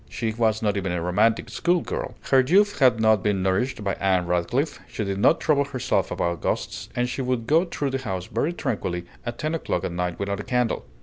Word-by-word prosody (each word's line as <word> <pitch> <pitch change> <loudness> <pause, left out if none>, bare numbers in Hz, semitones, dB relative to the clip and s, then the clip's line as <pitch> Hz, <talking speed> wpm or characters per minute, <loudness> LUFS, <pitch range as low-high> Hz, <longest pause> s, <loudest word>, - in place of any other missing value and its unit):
She 110 -2 -2
was 110 -1 +1
not 105 -1 +1
even 95 -2 -2
a 90 - -1
romantic 105 +7 +1
school 175 0 +1
girl. - - -4
Her 135 - +3
youth 200 +10 +3
had 125 -5 +5
not 110 -2 +4
been 100 -2 0
nourished 100 +5 0
by 100 -1 0
Anne 95 -2 +2
Radcliffe, 90 - 0
she 110 - -4
did 100 -1 -2
not 160 - +4
trouble 140 -2 +2
herself 130 -3 -1
about 85 -2 -2
ghosts, - - -3
and 120 0 +1
she 125 - -3
would 125 -3 -1
go 160 +8 +3
through 145 -5 -3
the 135 - -1
house 95 -8 -4
very 155 - -1
tranquilly 90 - -3 0.2
at 120 0 -4
ten 155 +1 -2
o'clock 155 - -2
at 90 - -2
night 90 0 -2
without 100 0 -2
a - - -4
candle. 125 -2 0
110 Hz, 225 wpm, -24 LUFS, 95-135 Hz, 0.2 s, had